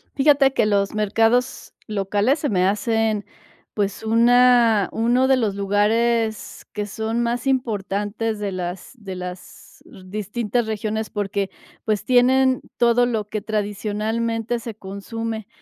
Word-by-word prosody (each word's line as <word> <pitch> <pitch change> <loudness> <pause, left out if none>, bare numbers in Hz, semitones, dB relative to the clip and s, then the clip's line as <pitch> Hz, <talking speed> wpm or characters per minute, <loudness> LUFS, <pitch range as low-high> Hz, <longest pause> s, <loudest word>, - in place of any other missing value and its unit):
Fíjate 275 -1 +4
que 215 - +2
los 200 -1 +1
mercados 225 +4 +1
locales 205 +6 +1
se 290 - -1
me 185 -2 +2
hacen, 220 0 0 0.5
pues, 205 0 -2
una 235 -2 +4
uno 245 +3 +2
de 265 -1 +4
los 210 -5 0
lugares 220 +3 0
que 210 -1 -3
son 220 +3 -2
más 240 +2 -2
importantes 215 -3 -1
de 205 -1 -3
las 180 0 -5
de 200 -6 -8
las 180 0 -9
r 195 -7 -14
distintas 215 +4 -2
regiones 220 0 -3
porque, 200 -1 -2 0.3
pues, 215 -2 -1
tienen 260 +1 +4 0.2
todo 240 0 +3
lo 220 -4 -2
que 215 0 -4
tradicionalmente 220 +3 -2
se 230 -2 -7
consume. 220 +2 -6
220 Hz, 130 wpm, -22 LUFS, 205-235 Hz, 0.5 s, Fíjate